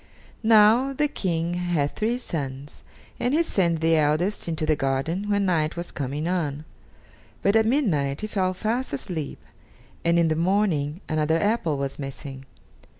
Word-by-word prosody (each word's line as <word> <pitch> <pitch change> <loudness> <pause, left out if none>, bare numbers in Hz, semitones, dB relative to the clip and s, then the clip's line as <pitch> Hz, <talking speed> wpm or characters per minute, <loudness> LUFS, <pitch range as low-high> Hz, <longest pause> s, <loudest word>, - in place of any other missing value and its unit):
Now, 225 +4 +5
the 295 +2 +1
King 170 - -2
had 175 -5 -1
three 230 +3 0
sons, 140 - -6 0.4
and 245 +4 +1
he 335 - +4
sent 170 - +1
the 165 0 +4
eldest 155 +8 +1
into 160 -2 -2
the 155 - +2
garden 145 +9 -1
when 205 -1 +2
night 160 -4 +1
was 170 0 -5
coming 145 +3 -3
on; 155 -5 -2 0.8
but 200 +2 +3
at 220 0 +4
midnight 155 - +1
he - - -2
fell 190 -3 -1
fast 230 - -2
asleep, 155 +1 -4 0.6
and 170 0 +3
in 170 -1 +4
the 155 - +1
morning 170 -3 +1
another 155 +1 +1
apple 205 -8 +1
was 140 0 -4
missing. 135 -1 -7
170 Hz, 155 wpm, -25 LUFS, 150-205 Hz, 0.8 s, Now